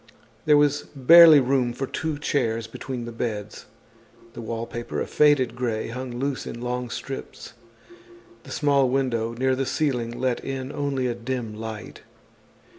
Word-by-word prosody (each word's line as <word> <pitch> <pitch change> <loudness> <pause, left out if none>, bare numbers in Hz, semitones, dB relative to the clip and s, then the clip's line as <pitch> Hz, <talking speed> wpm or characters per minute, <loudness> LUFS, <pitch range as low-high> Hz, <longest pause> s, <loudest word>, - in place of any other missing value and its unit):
There 150 -1 +6
was 145 0 +2
barely 160 +3 +9
room 130 -2 +1
for 135 +3 -3
two 155 +3 -3
chairs 115 -6 -1
between 120 +2 -6
the 120 - -6
beds. 105 -3 -5 0.7
The - - -8
wallpaper, 115 +1 -5
a - - -1
faded 140 -6 +3
gray, 115 -3 -2
hung 125 0 -6
loose 135 +1 -3
in 120 - -6
long 125 0 -3
strips. 135 +3 -7 0.9
The - - -15
small 140 -3 +2
window 120 -4 0
near 130 +2 +1
the 135 0 -2
ceiling 125 -6 -1
let 125 -1 -1
in 135 0 -4
only 140 -2 -2
a 120 - 0
dim 120 -1 -4
light. 110 0 -8
125 Hz, 150 wpm, -24 LUFS, 115-135 Hz, 0.9 s, barely